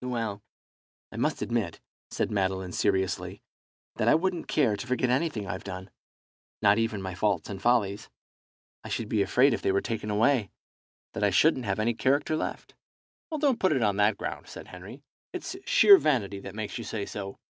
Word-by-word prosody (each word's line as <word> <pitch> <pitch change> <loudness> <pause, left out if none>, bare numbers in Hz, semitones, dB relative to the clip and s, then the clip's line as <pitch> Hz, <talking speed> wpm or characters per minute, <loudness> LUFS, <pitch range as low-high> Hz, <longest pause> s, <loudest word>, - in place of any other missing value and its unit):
"Well, 115 -5 -3 0.7
I - - -9
must - - 0
admit," - - -2 0.3
said - - -2
Madeline, 95 -2 -1
seriously, 95 +1 -1 0.5
"that - - 0
I - - +6
wouldn't 175 +1 -1
care 125 -9 +2
to 125 - -7
forget 125 0 +1
anything 130 -6 0
I've 95 0 -5
done, 95 0 -7 0.7
not 105 +1 +4
even 110 -3 -1
my 95 -1 -4
faults 105 +3 -1
and 95 -1 -7
follies. 105 -3 +1 0.7
I - - -8
should 115 - -3
be 110 - +1
afraid 125 +6 +4
if - - -2
they - - +1
were 100 - +2
taken 110 -1 -4
away 110 0 +2 0.6
that 105 - -3
I 105 - +4
shouldn't 130 - +3
have 95 -2 -1
any 110 +2 +1
character 140 +6 +1
left." - - -5 0.7
"Don't 280 -5 +2
put 185 -4 +3
it 130 -5 +1
on 100 -2 +1
that 105 0 +3
ground," - - -5
said - - -10
Henry, 95 +10 -11 0.3
"it's 365 0 -5
sheer 455 -6 +8
vanity 105 - 0
that 100 0 -9
makes 110 +2 -4
you - - -5
say 105 -3 -4
so. 100 -1 -7
110 Hz, 185 wpm, -28 LUFS, 100-130 Hz, 0.7 s, sheer